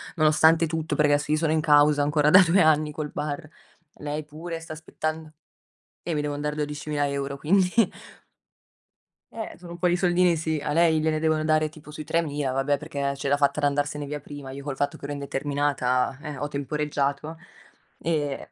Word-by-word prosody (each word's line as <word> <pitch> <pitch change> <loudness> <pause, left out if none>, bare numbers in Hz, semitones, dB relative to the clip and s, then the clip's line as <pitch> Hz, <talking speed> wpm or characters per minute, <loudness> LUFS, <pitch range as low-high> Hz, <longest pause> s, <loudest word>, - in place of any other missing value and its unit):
nonostante 160 +1 +4
tutto, 160 -1 -2
perché 150 -1 +4
adesso 145 +1 0
io 155 - +3
sono 155 -1 +1
in 160 - +2
causa 145 -1 +5
ancora 145 +1 +2
da 185 +4 +9
2 180 +3 +4
anni 155 -1 +3
col 150 0 -5
bar. 150 0 -4 0.5
Lei 150 +1 -4
pure 165 +3 -7
sta 165 -1 -8
aspettando 155 0 -5 0.8
Eh, - - -2
mi 150 - 0
devon 150 0 -2
mandare 150 0 -2
12.000 150 -1 -2
euro, 140 0 -3
quindi. 180 +4 +2 1.6
Eh, 225 -1 -6
sono 175 -1 -11
un 170 - -7
po' 180 - +2
di 175 - +2
soldini 180 -1 +3
sì, 160 -1 -2
a 150 - -1
lei 165 -1 +4
gliene 155 0 +1
devono 155 -1 +1
dare 155 0 +2
tipo 150 -1 -15
sui 155 +1 -7
3.000, 150 -4 -1
vabbè 135 +2 +1
perché, 150 0 -7
ehm, 140 0 0
ce 140 - -4
l'ha 145 - +3
fatta 140 +1 +1
ad 145 - +1
andarsene 145 +1 -1
via 150 +1 -5
prima, 145 -2 -9
io 140 +1 -8
col 140 -1 -4
fatto 145 +1 -1
che - - -9
ero 145 - -4
indeterminata 140 -2 -1
eh, 150 -3 -6
ho 145 - -3
temporeggiato, 145 +1 -2 0.6
ehm, 150 -4 -1
150 Hz, 195 wpm, -25 LUFS, 145-160 Hz, 1.6 s, da